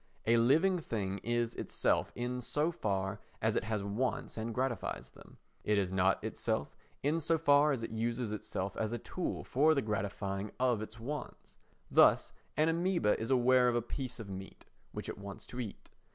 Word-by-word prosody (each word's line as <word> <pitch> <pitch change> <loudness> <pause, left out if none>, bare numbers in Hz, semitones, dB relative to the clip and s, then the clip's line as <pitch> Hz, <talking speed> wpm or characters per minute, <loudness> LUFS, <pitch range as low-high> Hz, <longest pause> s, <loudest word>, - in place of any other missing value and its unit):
A 115 +1 +5
living 160 +11 +4
thing 100 -9 -3
is 120 0 0
itself - - 0
in 125 +1 -2
so 150 +6 0
far 100 - -1 0.2
as - - +1
it - - 0
has 110 -2 -1
wants 110 +6 -2
and 110 +1 -3
gratifies 125 +1 -2
them. - - -16 0.3
It 105 0 +2
is 95 -2 +1
not 95 0 +2
itself 70 - -2 0.3
in 155 +4 +1
so 165 +2 +2
far 145 -1 +5
as 130 -5 -1
it - - -4
uses 115 0 -1
itself 100 -2 -3
as 110 +1 -1
a - - 0
tool 175 +9 -4
for 155 +4 +3
the 140 - +2
gratifying 100 -1 -2
of 125 -4 +2
its 110 +1 -7
wants. 140 +4 -6 0.3
Thus - - +6 0.3
an 155 +1 +4
amœba 170 - +2
is 110 - -3
aware 125 -1 +5
of 120 - +2
a 120 - +2
piece 125 0 -5
of 110 - -6
meat 95 0 -8 0.3
which - - -6
it - - -5
wants 100 0 -8
to 125 - -8
eat. 110 -5 -6
120 Hz, 185 wpm, -33 LUFS, 105-135 Hz, 0.3 s, Thus